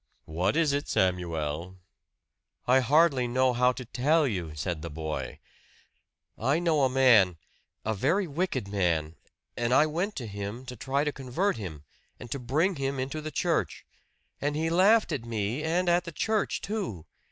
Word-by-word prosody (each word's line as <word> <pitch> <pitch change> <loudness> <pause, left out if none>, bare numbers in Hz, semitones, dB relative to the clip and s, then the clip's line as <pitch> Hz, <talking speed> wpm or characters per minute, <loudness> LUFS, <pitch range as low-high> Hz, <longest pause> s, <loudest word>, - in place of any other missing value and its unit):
"What 90 - -1
is 160 -3 +2
it, 145 +1 -1
Samuel?" 85 -1 -1 0.9
"I 130 +2 +5
hardly 135 -1 +3
know 130 +1 +2
how 125 +1 +3
to 125 0 -8
tell 150 +7 +2
you," 90 -9 -4
said 80 +2 -3
the 85 - -5
boy. 80 0 -5 1.0
"I 135 +7 +2
know 165 -3 +2
a - - +2
man 120 -9 +5 0.5
a 110 - 0
very 155 - +1
wicked 150 - -2
man; 85 -6 0 0.4
and 120 0 -1
I 150 - +6
went 175 +7 -2
to 125 - -5
him 100 +4 -6
to 125 -1 -7
try 135 +5 -1
to 150 - 0
convert 135 +7 -1
him, 80 -9 -7 0.4
and 120 - -10
to 140 - -2
bring 155 +10 0
him 135 0 -2
into 135 +4 -3
the 155 - -5
church. 165 +2 -1 0.6
And 145 +1 -1
he 160 +2 0
laughed 200 +4 +4
at 140 -7 -2
me, 115 +3 -2
and 170 +3 0
at 175 +1 +3
the 170 - -6
church, 215 +6 -1
too. 195 - -4
130 Hz, 170 wpm, -28 LUFS, 100-155 Hz, 1.0 s, I